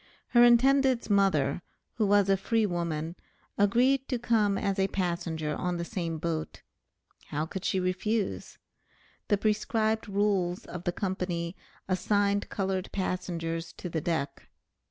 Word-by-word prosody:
Her 240 -1 +6
intended's 255 0 +4
mother, 175 -8 +2 0.3
who 215 -2 +1
was 205 -1 +4
a 195 - +4
free 220 +3 +1
woman, 170 -3 -2 0.4
agreed 250 +6 +3
to 250 - -1
come 220 -4 +2
as 195 -1 -1
a 190 - +3
passenger 170 -5 -2
on 180 +1 -2
the 170 - -3
same 170 -3 -3
boat. 160 -1 -4 0.6
How 150 +2 -2
could 190 +3 -6
she 190 - +1
refuse? 190 +3 -2 0.7
The 205 - +3
prescribed 215 +1 0
rules 195 -3 0
of 175 0 -8
the 175 - +1
Company 180 -2 -3 0.3
assigned 200 +2 +1
colored 190 -1 -2
passengers 170 -3 -3
to 180 - -7
the 160 -1 -2
deck. 160 -3 -3
190 Hz, 135 wpm, -29 LUFS, 170-210 Hz, 0.7 s, Her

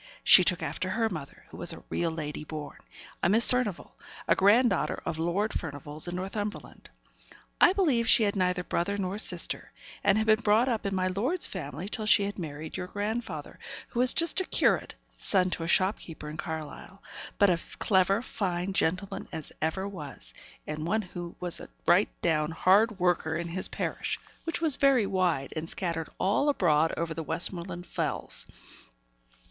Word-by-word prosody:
She 185 - +8
took 180 0 +1
after 185 - -3
her 225 +4 0
mother, 150 -6 -8
who - - -11
was - - -2
a - - -10
real 170 - 0
lady 150 -2 -5
born; 150 -2 -7 0.4
a - - +3
Miss 225 +4 +7
Furnivall, 250 -7 -1 0.4
a - - +4
grand 225 +6 +5
daughter 150 +2 -1
of 160 - -3
Lord 180 +6 0
Furnivall's, 150 0 -5
in 175 - -4
Northumberland. 205 +3 -5 0.7
I - - +8
believe 275 - +2
she 225 - +6
had 205 -1 +1
neither 180 -1 0
brother 190 +3 -1
nor 195 +1 -3
sister, - - 0 0.3
and 200 0 +4
had 220 - +1
been 215 +1 +4
brought 220 +4 +3
up 225 -4 -1
in 195 - -2
my 185 0 0
lord's 235 - 0
family 175 0 -6
till 215 0 -3
she 210 -1 +5
had 200 0 -4
married 155 0 -6
your 180 -1 -4
grandfather, 205 -6 -4 0.3
who 235 - -4
was 250 +1 +6
just 335 +3 +4
a - - -3
curate, - - +1 0.2
son 185 -2 +2
to - - -2
a 165 - -3
shopkeeper 170 -4 0
in - - -8
Carlisle 160 +4 -7 0.3
but 200 -2 +5
a 170 - -4
clever, 195 +2 +2
fine 185 -5 -2
gentleman 185 +2 -1
as 160 -3 -6
ever 175 +5 -1
was 145 - -9 0.3
and 155 +1 -4
one 215 +4 +1
who 175 -2 -8
was 180 -2 -3
a - - -10 0.2
right - - +4
down 150 -1 +1
hard 195 +6 +3
worker 175 -3 +1
in 170 0 -4
his 185 +2 -1
parish, - - -3 0.3
which 330 0 -3
was 315 -5 +3
very 270 -6 +4
wide, 180 -8 0
and 160 +1 -4
scattered 170 -6 -3
all 205 +10 +2
abroad 160 - +3
over 165 -1 -2
the 165 - -4
Westmoreland 175 +2 +1
Fells. - - -1
185 Hz, 180 wpm, -28 LUFS, 165-210 Hz, 0.7 s, She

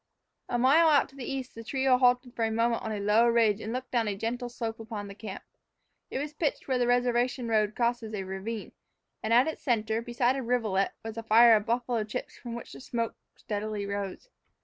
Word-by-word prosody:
A 240 - 0
mile 280 +7 +5
out 290 -3 +4
to 270 - -19
the 270 -1 -5
east 265 -1 -4
the 230 - -9
trio 265 +2 +2
halted 250 0 +3
for 230 - -1
a 225 - +2
moment 230 +1 +1
on 220 - -4
a 210 - -3
low 210 +4 +4
ridge 225 -3 +3
and 220 - -4
looked 255 +1 -4
down 235 -3 +1
a 205 - -1
gentle 240 +4 -3
slope 230 -2 -5
upon 220 -2 -6
the 200 - -8
camp. 210 +2 -8 0.7
It - - -3
was 290 +2 -4
pitched 300 -1 -2
where 260 -2 +1
the 245 - +2
reservation 245 0 +1
road 215 -2 +1
crossed 240 0 +1
a 215 -3 -5
ravine, 195 +4 -5 0.5
and 220 - -3
at 245 +4 +5
its 315 - -4
center, 225 -3 0
beside 240 +2 +1
a 270 - -2
rivulet, 225 -6 0
was 225 0 -6
a - - -2
fire 225 +1 +7
of 210 -1 -1
buffalo 235 -1 0
chips 215 +4 -6
from 235 -2 -7
which 235 - -8
the - - -10
smoke 230 -3 -2 0.2
steadily 210 -1 -4
arose. 200 - -4
230 Hz, 220 wpm, -29 LUFS, 215-250 Hz, 0.7 s, fire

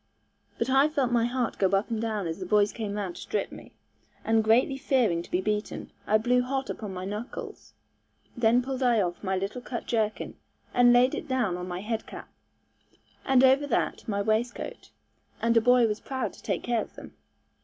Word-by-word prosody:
But 230 - -1
I 270 +2 +5
felt 275 -5 0
my 235 -1 +3
heart 245 -1 -2
go 195 - +4
up 195 +4 0
and 225 -1 -1
down 215 -4 -2
as 165 +2 -4
the 185 - -4
boys 205 +1 +3
came 215 -3 -4
round 190 -4 -4
to - - -8
strip 435 - -2
me; - - -11 0.5
and 225 0 +3
greatly 235 +5 +3
fearing 255 - +1
to - - -12
be 180 - 0
beaten, 210 +1 -3 0.2
I 215 - +5
blew 245 +3 +2
hot 265 +1 -2
upon 210 -3 -6
my 185 0 -5
knuckles. 210 +5 -7 0.6
Then 240 +1 +3
pulled 265 0 -4
I 240 -3 +3
off 175 -1 -2
my 190 -1 0
little 195 +6 -3
cut 240 -1 -5
jerkin, 220 -2 -1 0.4
and 245 0 +6
laid 245 +2 +5
it - - -4
down 250 -9 0
on 180 0 -5
my 180 0 -4
head 220 +2 -3
cap, - - -9 1.0
and 265 -1 +4
over 265 +2 +5
that 260 - -1
my 200 -2 -1
waistcoat, 220 +3 -2 0.5
and 230 0 +2
a 230 - +6
boy 245 +1 +5
was 210 -1 -1
proud 265 -1 -3
to - - -15
take - - -2
care 235 -2 +1
of - - -10
them. - - -11
230 Hz, 205 wpm, -27 LUFS, 205-250 Hz, 1.0 s, and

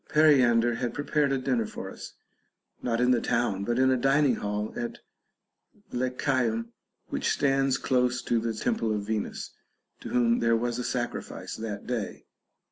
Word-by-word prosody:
Periander 125 -6 +5
had 120 0 -3
prepared 145 0 +1
a 135 - +2
dinner 125 -4 0
for - - -7
us, - - -9 0.7
not 115 -2 0
in 125 +1 +4
the 120 - +3
town, 115 -5 0
but 120 +3 -1
in 130 0 +4
a 130 - +3
dining 135 0 +3
hall 105 +1 -3
at 120 -1 -4 0.9
Lechaeum 125 -2 0 0.4
which - - -1
stands 135 -1 +2
close 125 -2 +1
to 120 - +1
the 115 0 -2
temple 115 - 0
of 100 -1 -3
Venus, 110 0 -3 0.5
to - - -8
whom 120 -1 +3
there 115 0 +3
was 120 +1 -2
a - - -2
sacrifice 120 0 -4
that 105 -2 -5
day. 120 -4 -4
120 Hz, 160 wpm, -28 LUFS, 115-130 Hz, 0.9 s, Periander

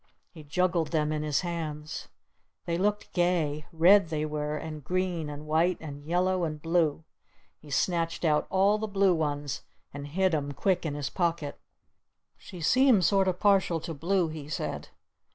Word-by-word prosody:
He 160 -4 -12
juggled 170 +2 +1
them 155 -2 0
in 155 -1 -1
his 150 -2 0
hands. 160 -3 -5 0.6
They 170 - -1
looked 205 +4 -1
gay. 165 -5 0
Red 175 +2 +5
they 155 -1 -1
were! 150 0 -3
And 155 -1 -7
green! 180 -1 -1
And 145 +1 -7
white! 165 +4 +2
And 145 -2 -8
yellow! 180 +3 +1
And 155 -2 -3
blue! 165 -1 +1 0.6
He 150 - -15
snatched 165 +3 0
out 150 -2 +2
all 200 +3 +3
the 220 - -2
blue 195 -2 +3
ones 145 -3 -2 0.3
and 145 0 -6
hid 185 +4 +1
'em 145 -2 -1
quick 180 +2 0
in 145 - -3
his 140 -1 -3
pocket. 170 -5 -1 0.8
"She 180 - -11
seems 250 - +4
sort 195 0 +3
of 180 -1 0
partial 195 -5 +3
to 165 - -5
blue," 170 +3 0
he 155 -2 -8
said. 140 - -4
165 Hz, 170 wpm, -28 LUFS, 150-185 Hz, 0.8 s, Red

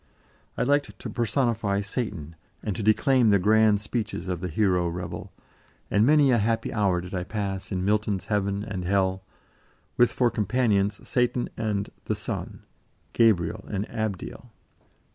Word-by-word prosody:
I - - +1
liked 145 +2 +1
to - - -7
personify 115 -5 0
Satan, 100 - -4 0.3
and 105 -4 -2
to 110 - -4
declaim 120 +3 +4
the 100 - +5
grand 105 +1 +4
speeches 105 -5 -3
of 90 -2 -3
the 90 - -2
hero 90 -1 +1
rebel, 90 +1 -5 0.6
and 105 - +4
many 145 -2 +5
a 120 - +4
happy 115 +2 0
hour 95 -5 +1
did 90 +2 -9
I 90 -1 -1
pass 95 -1 -4
in 95 -1 -1
Milton's 105 -2 0
heaven 100 -1 -1
and 100 -4 -4
hell, 95 0 +1 0.8
with 120 - +5
for 120 -2 +2
companions 105 -2 0
Satan 125 0 0
and 105 -3 -2
"the - - -1
Son," - - -5 0.5
Gabriel 105 -3 +2
and 100 0 -3
Abdiel. 110 +2 -4
105 Hz, 150 wpm, -26 LUFS, 95-115 Hz, 0.8 s, the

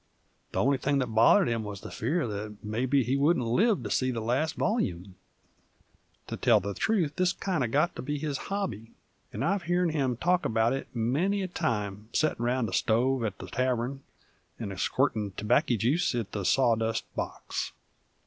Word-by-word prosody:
The - - 0
only 135 +1 +2
thing 140 +1 +1
that 125 -4 -1
bothered 110 +3 +5
him 115 -1 0
wuz 105 -1 -5
the - - -9
fear 170 0 -1
that 105 0 -6
mebbe 125 +5 +1
he 130 - +1
wouldn't 140 -2 +2
live 200 - +2
to - - -4
see 130 - +1
the 120 -2 -2
last 125 +8 0
volyume, 95 - -1 1.1
to - - -5
tell - - +4
the 100 +2 -4
truth, 170 - 0
this 180 -1 +2
kind 180 -8 -1
uv 120 - -1
got 150 +8 +1
to - - -5
be 145 +3 -3
his 145 -2 -3
hobby, 115 - -3 0.4
and - - -3
I've 190 +1 0
heern 175 -1 +1
him 135 -6 0
talk 180 +5 +2
'bout 115 +2 +2
it 135 - -4
many 160 - +1
a - - -2
time 105 - -3
settin' 155 -6 +1
round 120 -1 +1
the 95 - -6
stove 125 +5 +2
at 105 -4 -2
the - - -8
tarvern 130 +1 -1 0.6
'nd 105 -4 -4
squirtin' 110 -7 0
tobacco 120 +4 +2
juice 125 - +1
at 110 -4 -3
the 100 -3 -3
sawdust 115 -3 +2
box. - - -4
125 Hz, 185 wpm, -28 LUFS, 110-155 Hz, 1.1 s, bothered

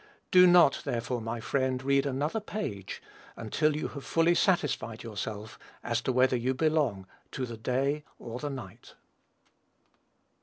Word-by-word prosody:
Do 180 0 +8
not, 175 -6 +6
therefore, 120 -2 -2
my 115 +1 -4
friend, 130 +2 -1
read 140 +1 +2
another 145 +9 -1
page, 180 - -5 0.3
until 150 +7 0
you 155 - -3
have 140 -2 -8
fully 165 +1 +3
satisfied 145 - 0
yourself 110 -1 -6 0.2
as 115 -1 -1
to 130 - -1
whether 130 0 +3
you 125 +2 0
belong 145 -10 +1 0.3
to 130 - -2
the 120 -2 -7
"day" 135 +6 -1
or 120 +1 -7
the 145 - -3
"night." 135 -3 -9
130 Hz, 145 wpm, -29 LUFS, 115-150 Hz, 0.3 s, Do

